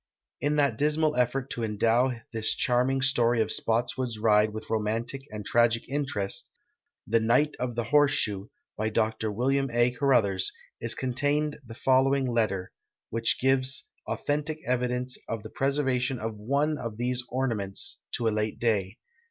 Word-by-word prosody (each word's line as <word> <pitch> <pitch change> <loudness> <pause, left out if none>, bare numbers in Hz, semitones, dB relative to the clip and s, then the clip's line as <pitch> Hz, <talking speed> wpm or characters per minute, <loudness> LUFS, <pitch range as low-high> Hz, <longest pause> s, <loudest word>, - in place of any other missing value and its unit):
In 145 +1 +1
that 140 -7 +2
dismal 150 +1 +2
effort 125 +2 0
to 120 - -3
endow 115 +4 +2 0.2
this 110 -1 +1
charming 130 +2 +1
story 120 -4 +3
of 110 0 +1
Spottswood's 120 +1 0
ride 105 -1 +4
with 110 0 -7
romantic 115 +4 -1
and 105 -1 -7
tragic 115 0 +2
interest, 135 - -2 0.3
" 285 - -57
The 115 +2 +3
Knight 125 +7 +2
of 125 -1 -2
the 120 - 0
Horse 145 +4 +4
Shoe," 100 -1 -1 0.3
by 110 +1 -1
Dr 110 0 0
Wm. 135 +5 +1
A. 120 +1 +3
Caruthers, 120 -8 +2 0.3
is 115 0 -3
contained 145 +4 0
the 115 -2 -10
following 135 +2 +3
letter, 110 -6 0 0.4
which 115 +1 0
gives 130 0 +1 0.2
authentic 150 +1 -2
evidence 125 0 -1
of 115 -2 -4
the 110 - -9
])reservation 135 -2 +1
of 115 0 -4
one 140 +8 0
of 115 -3 -5
these 125 +1 -1
ornaments 115 -7 -2
to 115 - 0
a - - +5
late 105 0 -1
da}'. 105 -2 0
120 Hz, 155 wpm, -28 LUFS, 110-135 Hz, 0.4 s, a